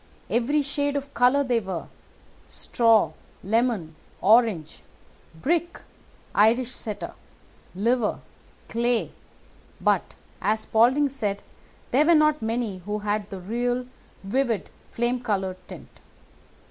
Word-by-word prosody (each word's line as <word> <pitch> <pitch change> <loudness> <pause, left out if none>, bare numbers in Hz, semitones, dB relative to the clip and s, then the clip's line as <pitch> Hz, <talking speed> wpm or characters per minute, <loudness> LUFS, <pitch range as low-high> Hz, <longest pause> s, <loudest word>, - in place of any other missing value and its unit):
Every 285 +6 +2
shade 285 0 -1
of 280 0 -4
colour 250 +4 +4
they 245 -3 +1
were—straw, 220 +3 -1 0.3
lemon, 220 -6 0 0.3
orange, 210 -7 +3 0.5
brick, 340 - -1 0.5
Irish 230 +4 +3
setter, 215 -4 -5 0.6
liver, 230 +3 +1 0.5
clay; 235 0 0 0.7
but, - - +1 0.3
as 215 +1 +1
Spaulding 250 +8 +3
said, 210 -7 -3 0.5
there 290 +5 +4
were 340 - +7
not 305 -1 +3
many 225 -3 -2
who 205 +4 -4
had 210 0 -2
the 195 - -6
real 245 +5 -1 0.4
vivid 230 0 -1 0.2
flame 240 +1 -1
coloured 195 -5 -1
tint. - - -10
235 Hz, 105 wpm, -25 LUFS, 210-255 Hz, 0.7 s, were